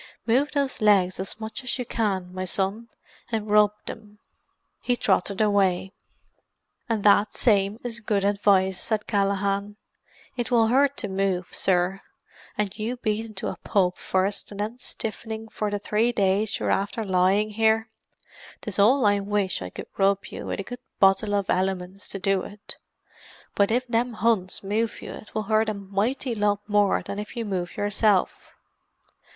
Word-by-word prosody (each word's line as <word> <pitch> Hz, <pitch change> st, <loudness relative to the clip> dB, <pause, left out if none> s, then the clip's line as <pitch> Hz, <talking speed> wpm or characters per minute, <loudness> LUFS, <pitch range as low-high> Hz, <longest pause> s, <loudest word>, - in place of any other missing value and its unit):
"Move 260 Hz, +6 st, +2 dB
those 280 Hz, -4 st, -1 dB
legs 195 Hz, -4 st, +4 dB
as 190 Hz, +3 st, -4 dB
much 220 Hz, +3 st, -5 dB
as 255 Hz, -, -2 dB
you 250 Hz, -, -3 dB
can, 190 Hz, -6 st, -2 dB
my 185 Hz, 0 st, -3 dB
son, 195 Hz, +6 st, -1 dB, 0.4 s
and 215 Hz, -2 st, -2 dB
rub 210 Hz, -1 st, +6 dB
them." 210 Hz, -1 st, -9 dB, 0.6 s
He 245 Hz, -, +1 dB
trotted 200 Hz, -4 st, +1 dB
away. 195 Hz, -2 st, +2 dB, 1.0 s
"And 220 Hz, -3 st, 0 dB
that 205 Hz, 0 st, +4 dB
same 205 Hz, -1 st, +2 dB
is 235 Hz, -1 st, -3 dB
good 210 Hz, -3 st, 0 dB
advice," 195 Hz, -2 st, +3 dB
said 215 Hz, -2 st, -1 dB
Callaghan. 200 Hz, 0 st, 0 dB, 0.6 s
"It 240 Hz, -2 st, -2 dB
will 230 Hz, -3 st, +4 dB
hurt 275 Hz, +3 st, +3 dB
to 210 Hz, -, -2 dB
move, 190 Hz, -2 st, -1 dB
sir, 185 Hz, +1 st, +1 dB, 0.6 s
and 210 Hz, -2 st, -1 dB
you 230 Hz, +4 st, -2 dB
beaten 220 Hz, -1 st, -2 dB
to 190 Hz, -, -3 dB
a -, -, -6 dB
pulp 185 Hz, -3 st, +1 dB
first 190 Hz, +2 st, -1 dB
and 205 Hz, -, -9 dB
then 220 Hz, +4 st, -3 dB
stiffening 225 Hz, -2 st, -5 dB
for 215 Hz, -1 st, -2 dB
the 205 Hz, -, -1 dB
three 215 Hz, +3 st, +1 dB
days 200 Hz, -1 st, +1 dB
you're -, -, -1 dB
after 205 Hz, +3 st, -1 dB
lying 190 Hz, +3 st, +2 dB
here; 220 Hz, +1 st, +2 dB, 0.7 s
'tis 205 Hz, -2 st, -2 dB
all 240 Hz, +5 st, +5 dB
I 205 Hz, 0 st, +4 dB
wish 200 Hz, -, -1 dB
I 90 Hz, -, -5 dB
could -, -, -8 dB
rub 195 Hz, 0 st, +2 dB
you, -, -, -7 dB
with -, -, -3 dB
a -, -, -2 dB
good 245 Hz, +5 st, -8 dB, 0.2 s
bottle 200 Hz, +2 st, +4 dB
of 200 Hz, -2 st, 0 dB
Elliman's 185 Hz, +1 st, -2 dB
to -, -, -5 dB
do 195 Hz, 0 st, +1 dB
it -, -, -7 dB
with. 205 Hz, 0 st, -11 dB, 0.8 s
But 200 Hz, -1 st, +3 dB
if 245 Hz, +3 st, +1 dB
them 240 Hz, 0 st, 0 dB
Huns 215 Hz, -5 st, 0 dB
move 215 Hz, +3 st, -1 dB
you -, -, -7 dB
'twill 215 Hz, 0 st, -3 dB
hurt 220 Hz, +1 st, +2 dB
a 215 Hz, -, -2 dB
mighty 205 Hz, +6 st, -2 dB
lot 205 Hz, -1 st, 0 dB
more 205 Hz, -1 st, +2 dB
than 200 Hz, -, -5 dB
if 210 Hz, 0 st, -7 dB
you 230 Hz, -, -2 dB
move 185 Hz, -4 st, -3 dB
yourself. 205 Hz, -1 st, +1 dB
205 Hz, 170 wpm, -25 LUFS, 195-225 Hz, 1.0 s, rub